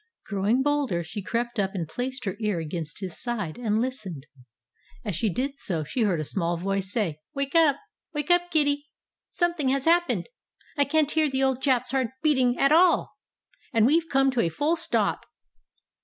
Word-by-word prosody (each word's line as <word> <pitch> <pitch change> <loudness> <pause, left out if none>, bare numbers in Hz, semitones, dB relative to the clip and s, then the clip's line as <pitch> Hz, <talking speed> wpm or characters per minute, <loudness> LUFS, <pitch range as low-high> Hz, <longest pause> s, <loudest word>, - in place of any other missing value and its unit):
Growing 210 +6 +1
bolder, 285 -12 0
she 195 +6 -6
crept 235 +3 -2
up 195 0 -1
and 170 -4 -2
placed 255 - -4
her 195 - -2
ear 210 -4 0
against 165 +2 -4
his 185 -3 -5
side, 210 -10 -3
and 215 -3 0
listened. 215 - -4 0.8
As 205 -5 -2
she 210 +5 0
did 275 +8 -3
so 165 -5 -1
she 235 - -3
heard 195 -7 +2
a - - -1
small 170 +2 -1
voice 195 +2 -2
say, 185 -9 -1 0.2
"Wake 275 0 -2
up! 320 -4 +5 0.4
Wake 295 +1 -2
up, 350 0 +3
Kiddi! 290 -3 +1 0.4
Something 340 -6 0
has 275 0 0
happened! 345 +1 +2 0.5
I 285 -2 +3
can't 310 -1 +2
hear 315 -2 +2
the 265 0 0
old 265 -1 +1
chap's 255 -3 +1
heart 265 -2 +1 0.2
beating 260 -5 +3
at 275 - +3
all! 340 +2 +4 0.6
And 225 -2 +4
we've 320 +5 +2
come 270 0 +3
to 250 -2 +1
a 170 - +1
full 295 - 0
stop!" 340 - 0
250 Hz, 185 wpm, -26 LUFS, 195-290 Hz, 0.8 s, up